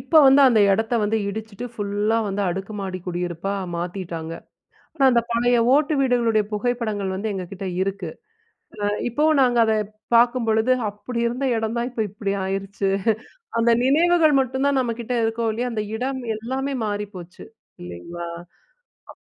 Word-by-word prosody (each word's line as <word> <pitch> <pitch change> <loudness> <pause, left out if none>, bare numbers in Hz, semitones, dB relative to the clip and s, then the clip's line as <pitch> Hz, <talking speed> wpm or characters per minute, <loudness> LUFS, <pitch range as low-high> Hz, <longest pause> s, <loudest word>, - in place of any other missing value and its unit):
இப்போ 320 - +4
வந்து 270 +1 +7
அந்த 225 -4 +4
எடத்த 225 +4 0
வந்து 220 +2 +1
இடிச்சுட்டு, 220 +2 -6
ஃபுல்லா 205 +2 0
வந்து 200 +1 -2
அடுக்கு 195 +4 -4
மாடி 185 -1 -4
குடியிருப்பா 175 +2 -3 0.2
மாத்தீட்டாங்க. 170 -2 -5 0.6
ஆனா, 275 - +2
அந்த 235 -1 +3
பழைய 240 +1 +3 0.2
ஓட்டு 300 +1 +2
வீடுகளுடைய 235 -5 +2
புகைப்படங்கள் 210 -4 -1
வந்து 210 +3 -3
எங்ககிட்ட 190 +1 -5
இருக்கு. 195 -3 -3 0.7
அ - - +1 0.3
இப்போவும் 300 +3 +3
நாங்க 245 -2 +2
அத 220 - +2 0.4
பாக்கும்பொழுது, 235 -1 +3 0.2
அப்படி 210 +4 -5
இருந்த 245 +4 -2
எடந்தான், 235 +3 -2
இப்ப 225 -3 -1
இப்டி 200 0 -3
ஆயிருச்சு. 195 +1 -2 0.7
அந்த 235 +1 +3
நினைவுகள் 320 +2 +4
மட்டுந்தான் 265 +2 +1
நம்ம 235 -2 -1
கிட்ட 245 +2 -3
இருக்கும், 225 0 0
இல்லையா! 245 +2 -2
அந்த 215 -1 -1
இடம், 260 +2 -2 0.2
எல்லாமே 265 +5 -3
மாறிப்போச்சு 205 -4 -6 0.4
இல்லிங்களா. 90 - -7 0.8
அப் - - -13
220 Hz, 140 wpm, -23 LUFS, 195-245 Hz, 0.8 s, வந்து